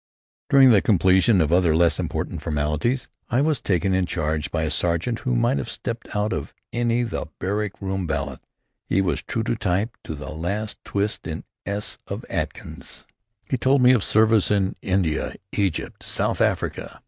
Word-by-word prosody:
During 135 -2 +7
the 100 -4 +6
completion 95 +1 +4
of 80 +1 +1
other, 85 -3 +4
less 85 -2 +3
important - - -3
formalities, 75 - -1 0.2
I 125 - +2
was 150 -4 +1
taken 95 0 +1
in 95 -1 +1
charge 80 -2 -1
by 80 -1 -1
a 80 - -1
sergeant 90 +7 0
who 125 -1 -1
might 120 +3 +2
have - - -4
stepped 115 -2 -5
out 105 +1 +1
of 70 - -5 0.2
any 120 0 +1
of 120 -3 -3
the - - -3
"Barrack 100 +2 -2
Room 95 -2 -2
Ballads." 75 -3 -3 0.5
He 95 - +2
was 90 -6 +1
true 115 - -2
to 120 - 0
type 100 +3 -1
to 80 - -4
the 75 - -7
last 100 +7 -3
twist 100 +1 -2
in - - -5 0.2
the - - -3
s 105 +1 -2
of - - -5
Atkins. - - -4 0.4
He 130 - 0
told 130 +1 +4
me 125 - +8
of 120 -6 +3
service 110 -1 +4
in 100 -2 +1
India, 90 -5 0 0.2
Egypt, 95 -5 -2
South - - -1
Africa. - - -1
100 Hz, 185 wpm, -24 LUFS, 85-115 Hz, 0.5 s, me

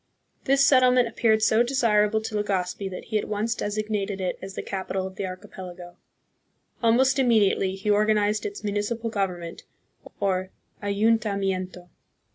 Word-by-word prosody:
This 275 0 +4
settlement 255 -3 +5
appeared 220 -1 +2
so 220 +1 +4
desirable 220 -4 +2
to 220 - -6
Legazpi 195 -2 -2
that 185 - -7
he 215 -2 0
at - - -5
once 215 +2 -1
designated 210 -2 -3
it 185 -1 -3
as 195 0 -8
the - - -4
capital 190 -1 -3
of 190 0 -8
the 195 - -3
archipelago. 185 -2 -9 0.9
Almost 260 +4 +3
immediately 210 -6 +3
he 200 +2 -1
organized 210 0 +2
its 405 - -6
municipal 210 +3 -2
government, 180 -5 -3 0.6
or 185 -1 0 0.3
ayuntamiento. 200 -4 0
210 Hz, 135 wpm, -25 LUFS, 190-225 Hz, 0.9 s, settlement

